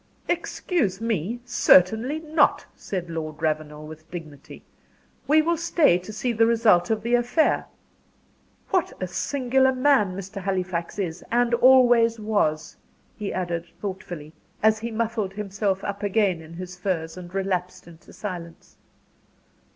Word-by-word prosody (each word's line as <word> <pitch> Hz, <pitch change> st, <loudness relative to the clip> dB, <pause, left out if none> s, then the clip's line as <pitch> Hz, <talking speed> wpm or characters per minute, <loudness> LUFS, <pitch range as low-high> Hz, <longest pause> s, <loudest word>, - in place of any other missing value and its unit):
"Excuse 335 Hz, -, -1 dB
me 225 Hz, 0 st, -2 dB
certainly 230 Hz, -, +4 dB
not," 315 Hz, 0 st, +2 dB
said 180 Hz, -3 st, -5 dB
Lord 155 Hz, -2 st, -5 dB
Ravenel, 155 Hz, -1 st, -2 dB
with 155 Hz, +1 st, -12 dB
dignity. 155 Hz, -5 st, -10 dB, 0.6 s
"We 310 Hz, +2 st, +5 dB
will 340 Hz, +1 st, +1 dB
stay 320 Hz, -, +3 dB
to 185 Hz, +4 st, -9 dB
see 235 Hz, +3 st, -2 dB
the 225 Hz, 0 st, +3 dB
result 220 Hz, -7 st, +3 dB
of 220 Hz, -1 st, 0 dB
the 235 Hz, +1 st, -1 dB
affair. 245 Hz, +6 st, +2 dB, 1.0 s
What 370 Hz, -3 st, +1 dB
a 185 Hz, -, -2 dB
singular 265 Hz, +6 st, +1 dB
man 255 Hz, -8 st, +2 dB
Mr. 195 Hz, 0 st, -7 dB
Halifax 185 Hz, -3 st, -2 dB
is, 180 Hz, -4 st, -3 dB
and 240 Hz, 0 st, +2 dB
always 240 Hz, -2 st, +5 dB
was," 160 Hz, -8 st, -1 dB, 0.4 s
he 205 Hz, -2 st, -4 dB
added, 175 Hz, -2 st, -3 dB
thoughtfully, 180 Hz, -6 st, -6 dB, 0.3 s
as 220 Hz, 0 st, +4 dB
he 230 Hz, +1 st, -4 dB
muffled 220 Hz, -3 st, -2 dB
himself 200 Hz, -1 st, -2 dB
up 200 Hz, 0 st, -4 dB
again 200 Hz, -4 st, +1 dB
in 160 Hz, +1 st, -12 dB
his 180 Hz, 0 st, -7 dB
furs, 175 Hz, -3 st, -3 dB
and 180 Hz, -1 st, -10 dB
relapsed 185 Hz, -1 st, -3 dB
into 170 Hz, -1 st, -15 dB
silence. 175 Hz, -5 st, -8 dB
195 Hz, 135 wpm, -24 LUFS, 175-235 Hz, 1.0 s, We